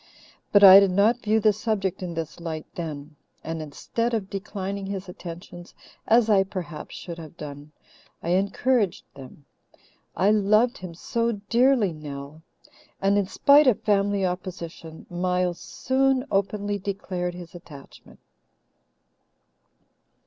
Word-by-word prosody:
But 205 0 +5
I 195 0 +11
did 200 -1 +3
not 210 +6 +2
view 220 0 +2
the 215 -1 +4
subject 200 -4 -2
in 175 -2 -5
this 165 +1 -5
light 160 -2 -5
then; 150 -3 -7 0.3
and 160 0 -4
instead 230 +10 -3
of 200 -3 -4
declining 195 0 -5
his 195 -1 -5
attentions, 175 0 -10 0.3
as 230 0 +4
I 205 -3 +5
perhaps 180 -4 -7
should 170 -1 -8
have 160 0 -11
done, 145 0 -9 0.5
I - - -3
encouraged 200 +2 +1
them 135 +1 -13 0.7
I 200 +2 +3
loved 215 +4 +3
him 180 -2 -8
so 230 +6 -1
dearly, 230 0 +2
Nell! 145 0 -9 0.6
and 195 +1 +2
in 200 -2 +1
spite 285 +7 +5
of 245 - +2
family 200 -1 +1
opposition, 170 -3 -6
Miles 180 0 -1
soon 265 0 0
openly 205 +1 -1
declared 185 -3 -4
his 175 +1 -10
attachment. 155 -6 -14
190 Hz, 130 wpm, -25 LUFS, 170-210 Hz, 0.7 s, I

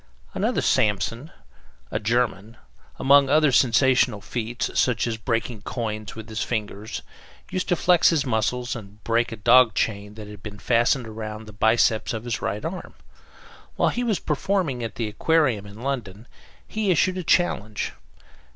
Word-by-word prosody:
Another - - 0
"Samson," 115 +7 +1 0.6
a - - -1
German, 115 -1 -1 0.4
among 140 0 +5
other 150 0 +4
sensational 125 -2 +3
feats, 120 +3 -3
such 120 -5 +2
as 115 -2 -2
breaking 115 -1 -2
coins 110 -2 -4
with 110 -1 -8
his 110 -1 -4
fingers, 105 -2 -4 0.5
used 185 - -2
to 175 - +3
flex 175 0 +4
his 155 -4 +1
muscles 125 +1 -1
and 105 -2 -11
break 115 +1 +1
a - - -4
dog 120 0 +5
chain 105 +1 -2
that 105 -1 -9
had 105 -1 -11
been 105 -1 -8
fastened 120 +2 +1
round 110 0 -7
the 105 - -12
biceps 110 +2 +2
of 110 - -5
his 120 -1 -3
right 105 - -3
arm. 180 +3 -6 0.8
While - - +2
he 245 - -2
was 220 -5 +1
performing 150 -5 -1
at 115 - -5
the 115 -2 -2
Aquarium, 120 -2 +1
in 105 +4 -11
London, 120 -5 -4 0.4
he 215 -2 -2
issued 185 +2 +2
a - - -4
challenge. 110 - 0
115 Hz, 160 wpm, -24 LUFS, 110-135 Hz, 0.8 s, among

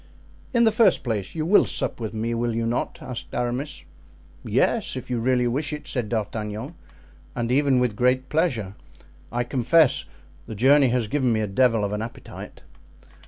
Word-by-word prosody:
"In 235 -2 +3
the 225 - +5
first 220 +1 +3
place, 110 - -3
you 155 -1 -2
will 195 +5 +6
sup - - -3
with 110 -2 -4
me, 115 +1 -2
will 115 0 -1
you 115 0 -1
not?" 115 +1 -2
asked 125 -2 -7
Aramis. 125 +4 -3 0.6
"Yes, - - +1
if - - -6
you 120 - 0
really 125 +1 +2
wish 140 +5 -1
it," 150 0 -6
said 120 -5 -3
D'Artagnan, 110 +4 -3 0.6
"and 120 0 -2
even 135 -1 +3
with 125 -4 0
great 125 +3 +2
pleasure, 130 - 0 0.6
I 120 +1 0
confess; 135 +4 +3 0.4
the 110 - -6
journey 135 +5 +5
has 120 -2 0
given 130 0 +1
me 110 -1 +1
a - - 0
devil 115 +2 +2
of 100 0 -1
an 105 - -2
appetite." 115 +1 -9
120 Hz, 175 wpm, -24 LUFS, 115-135 Hz, 0.6 s, will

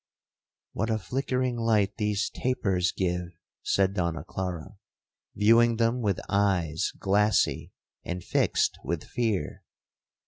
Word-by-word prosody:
'—'What 110 +3 -1
a 110 - +1
flickering 125 +2 -1
light 105 -4 +1
these 105 +2 0
tapers 95 -8 0
give!' 90 -2 -2 0.2
said 95 -1 +1
Donna 85 -5 -2
Clara, 95 +2 -5 0.6
viewing 115 +2 +5
them 115 +2 +1
with 100 -5 0
eyes 95 -6 +1
glassy 105 +2 +1 0.3
and 90 0 -5
fixed - - +1
with 85 -2 -3
fear. 110 -10 -2
100 Hz, 110 wpm, -27 LUFS, 90-115 Hz, 0.6 s, viewing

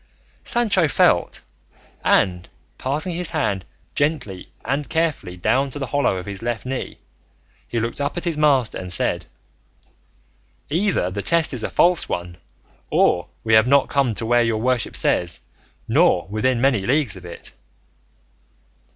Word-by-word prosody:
Sancho 205 -8 +2
felt, - - +2 0.6
and 90 -1 +2 0.3
passing 150 +7 -2
his 175 -1 -1
hand 100 - -1 0.3
gently 145 - -2
and 140 +1 -2
carefully 160 - -1
down 135 +10 +1
to 135 - -8
the 140 - -3
hollow 140 -8 0
of 90 - -6
his 100 0 -6
left 120 -1 -3
knee, 130 0 -4 0.7
he 120 - -3
looked 115 +5 -3
up 140 +4 -2
at 175 - -3
his 170 -2 0
master 140 -6 +2
and 90 -1 -6
said, 85 - 0 1.4
"Either 170 - +1
the 100 +2 -3
test 165 +5 +2
is 125 - -2
a - - -2
false 175 0 +3
one, 85 0 -4 0.5
or - - +2 0.2
we 110 - +1
have 110 +2 +6
not 140 +1 +4
come 135 -5 +1
to 115 - -3
where 120 +1 +3
your 115 -2 +1
worship 125 0 0
says, 85 -3 +1 0.5
nor 85 - +3
within 115 +4 0
many 125 -4 +2
leagues 130 -2 +1
of 95 - -11
it." 85 -1 -8
125 Hz, 150 wpm, -22 LUFS, 100-150 Hz, 1.4 s, have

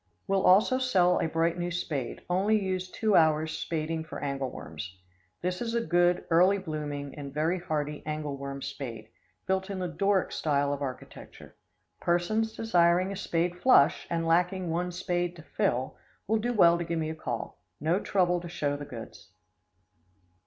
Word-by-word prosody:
Will 195 0 +1
also 210 +8 +5
sell 185 -9 +3
a - - +1
bright 165 +2 0
new 175 0 -1
spade, 155 -7 -3
only 200 +5 +2
used 185 -2 -3
two 215 -3 +2
hours 155 -1 +3
spading 160 0 -2
for 160 - -8
angle 140 -2 -2
worms. 85 0 -8 0.5
This 180 0 -2
is 235 -1 -2
a 230 0 0
good, 175 0 +2
early 180 +4 +5
blooming 150 -5 -5
and 140 -2 -7
very 160 +5 0
hardy 150 -3 -3
angle 150 -2 -3
worm 140 0 -6
spade, 115 -5 -6 0.4
built 190 +1 0
in 195 - -3
the 180 -1 -2
Doric 195 +2 +1
style 145 -2 +1
of 145 - -5
architecture. 130 -2 -8 0.4
Persons 215 +6 +1
desiring 180 -4 +3
a - - -4
spade 175 -2 -1
flush, 260 - +5
and 165 0 -1
lacking 175 +1 +1
one 175 +2 -1
spade 175 0 -2
to 165 - -12
"fill," 130 -3 -1 0.3
will 220 +2 +1
do 240 +3 -1
well 170 -7 +5
to - - -1
give 170 0 -2
me 160 -1 -1
a - - -6
call. 155 - -5 0.2
No 165 +6 +1
trouble 180 -4 +1
to 175 - -7
show 145 -4 -1
the 145 0 -6
goods. 115 -5 -10
170 Hz, 175 wpm, -29 LUFS, 150-185 Hz, 0.5 s, also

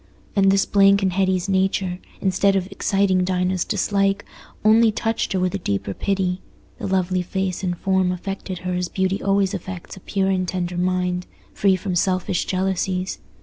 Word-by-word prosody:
And 195 -1 +4
this 195 0 +3
blank 200 0 +4
in 190 - +2
Hetty's 185 0 +1
nature, 190 -1 0 0.2
instead 195 +1 +2
of 190 -2 +1
exciting 195 -1 +1
Dinah's 180 0 0
dislike, 200 -1 0 0.4
only 220 +1 +6
touched 225 0 -1
her 190 - +1
with 185 0 0
a 200 - -2
deeper 100 - -2
pity: 190 - -1 0.4
the - - -3
lovely 185 -1 +1
face 190 0 -2
and 175 -2 -1
form 190 0 +1
affected 190 +1 -5
her 180 - -1
as 180 0 -1
beauty 190 0 -1
always 195 -1 +2
affects 185 -1 -6
a - - -11
pure 195 +1 -1
and 185 -1 0
tender 180 -1 -2
mind, 180 0 0 0.3
free 195 -1 +3
from 185 +1 -3
selfish 185 0 0
jealousies. 185 0 -1
190 Hz, 170 wpm, -22 LUFS, 180-195 Hz, 0.4 s, only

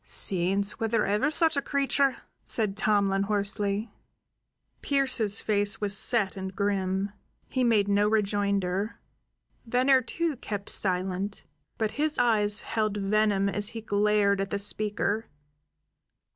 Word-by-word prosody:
"Saints! 195 +2 -1
Was 225 - -1
there 225 -1 +1
ever 210 +8 +1
such 320 0 +2
a 280 - +1
creature?" 275 -1 0 0.3
said 210 -4 -1
Tomlin 200 -2 +1
hoarsely. 205 +1 -1 0.9
Pearse's 255 -7 +2
face 205 0 +1
was 205 -1 +2
set 205 -2 +3
and 190 -1 -6
grim; 195 -1 -1 0.4
he 255 - -1
made 220 -4 +3
no 205 +1 +2
rejoinder. 200 -1 -1 0.6
Venner, 255 +3 +3
too, 325 +3 -3
kept 205 -3 -5
silent; 190 +1 -1 0.3
but 220 -2 -1
his 310 0 0
eyes 210 -4 +2
held 215 -2 -2
venom 205 0 +1
as 205 +1 0
he 225 - -7
glared 205 -1 +1
at 195 - -3
the 200 - -2
speaker. 210 +1 -1
205 Hz, 130 wpm, -27 LUFS, 200-225 Hz, 0.9 s, set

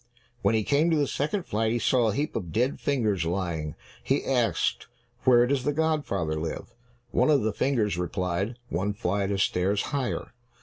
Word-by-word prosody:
When 115 - +3
he 110 - +2
came 145 +8 +2
to 160 - +3
the 145 - +3
second 155 +8 -1
flight, 110 -5 0
he 120 - +1
saw 120 0 +2
a 105 - -2
heap 150 +3 -2
of 85 -3 -3
dead 125 - 0
fingers 110 -10 0
lying. 85 -3 -2 0.3
He 135 +2 0
asked, 120 -8 0 0.4
"Where 120 -1 +6
does 135 0 0
the 145 - 0
godfather 140 - 0
live?" 80 +8 -5 0.4
One 125 +4 +3
of 145 -5 +4
the 110 -1 0
fingers 105 -8 0
replied, 90 +5 -2
"One 95 +4 -1
flight 100 -1 -1
of 100 -1 +2
stairs 95 +3 +1
higher." 135 -3 -2
110 Hz, 180 wpm, -27 LUFS, 95-135 Hz, 0.4 s, Where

